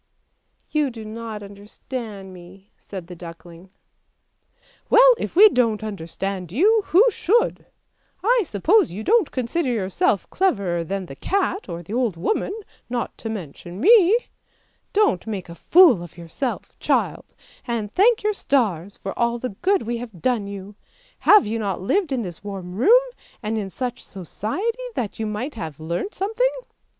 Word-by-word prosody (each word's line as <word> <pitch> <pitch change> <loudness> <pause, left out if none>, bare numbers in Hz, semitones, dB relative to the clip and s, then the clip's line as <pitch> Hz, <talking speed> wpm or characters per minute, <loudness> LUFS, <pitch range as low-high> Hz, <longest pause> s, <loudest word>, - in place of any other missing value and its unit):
" - - -48
' - - -44
You 300 -3 +1
do 225 -3 -9
not 220 -1 -6
understand 200 0 -8
me," 185 +2 -15
said 190 -4 -9
the 180 +1 -10
duckling. 170 +1 -12 0.6
" - - -36
Well, - - +8
if - - -4
we 415 +5 +9
don't 230 - +1
understand 190 -2 -5
you, 420 - +4
who 380 +8 +6
should? 435 +4 +1 0.6
I 480 +3 +4
suppose 335 - +2
you 205 +5 -6
don't 445 - +3
consider 255 +3 -1
yourself 195 -3 0
cleverer 200 - 0
than 195 +3 -4
the 135 - -10
cat 390 - -1
or 170 +1 -5
the 195 - -8
old 235 -7 0
woman, 295 - -1 0.4
not 240 -1 -3
to 225 - -5
mention 175 -2 -7
me. 415 - +6 0.7
Don't 405 - +2
make 195 -5 -5
a - - -7
fool 315 - +5
of 175 -1 -11
yourself, 170 - -5
child, - - -1 0.3
and 225 -3 -3
thank 435 +3 +4
your 425 0 +1
stars 205 - 0
for 195 - -5
all 235 0 +1
the 250 +1 -4
good 370 - 0
we 235 +1 -2
have 230 -6 -9
done 230 -1 0
you! 200 0 -8 0.6
Have 420 -2 +8
you 225 +2 -2
not 200 -3 -2
lived 340 - 0
in 255 -3 0
this 175 -1 -8
warm 190 -3 -6
room, 435 - +5 0.4
and 215 +1 -2
in 205 -3 -3
such 245 +4 -4
society 230 - -4
that 225 -3 -3
you 220 - -1
might 215 +8 -4
have 160 -9 -7
learnt 170 - -4
something? 450 +6 +1
220 Hz, 165 wpm, -22 LUFS, -, 0.7 s, we